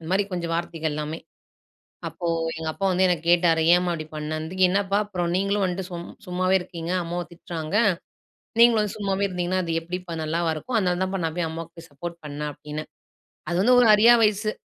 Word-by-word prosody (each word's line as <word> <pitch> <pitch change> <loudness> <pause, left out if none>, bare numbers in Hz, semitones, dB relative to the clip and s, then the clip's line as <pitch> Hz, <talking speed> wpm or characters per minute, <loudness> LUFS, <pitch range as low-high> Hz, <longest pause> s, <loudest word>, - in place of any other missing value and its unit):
இந்தமாரி 185 +5 +1
கொஞ்சம் 170 -2 -2
வார்த்தைகள் 165 -2 -2
எல்லாமே. 150 +2 -4 0.9
அப்போ 175 - -6 0.3
எங்க 160 0 -4
அப்பா 195 - -5
வந்து 185 +1 +2
என்ன 180 - +3
கேட்டாரு, 170 -2 +4
"ஏம்மா 180 0 +2
அப்பிடி 155 -2 -5
பண்ணேண்துக்கு?" 155 +4 -3
"என்னப்பா! 195 +1 +1
அப்புறம் 180 -4 -2
நீங்களும் 200 +2 +1
வந்துட்டு 185 +1 -2
சும் 175 -1 -6 0.2
சும்மாவே 185 +1 +1
இருக்கீங்க. 170 -1 -5
அம்மாவும் 175 +1 -4
திட்றாங்க. 165 0 -6 0.9
நீங்களும் 235 -2 +6
வந்து 210 - -3
சும்மாவே 200 -1 -1
இருந்தீங்கன்னா, 180 0 -1
அது 165 - -3
எப்பிடிப்பா 180 +1 -6
நல்லாவா 165 +1 0
இருக்கும்? 230 +10 -2
அதனால 180 -2 0
தான்ப்பா 190 +1 -2
நான் 160 0 -3
போய் 170 -2 0
அம்மாவுக்கு 165 +1 -8
போய் 165 - -13
சப்போர்ட் 170 +4 -7
பண்ணேன்" 150 0 -4
அப்பிடின்னேன். 150 +2 -7 0.6
அது 175 - 0
வந்து 250 +4 +5
ஒரு 240 - +5
அறியா 230 +3 +7
வயசு. 215 +1 +1
175 Hz, 180 wpm, -24 LUFS, 165-190 Hz, 0.9 s, அறியா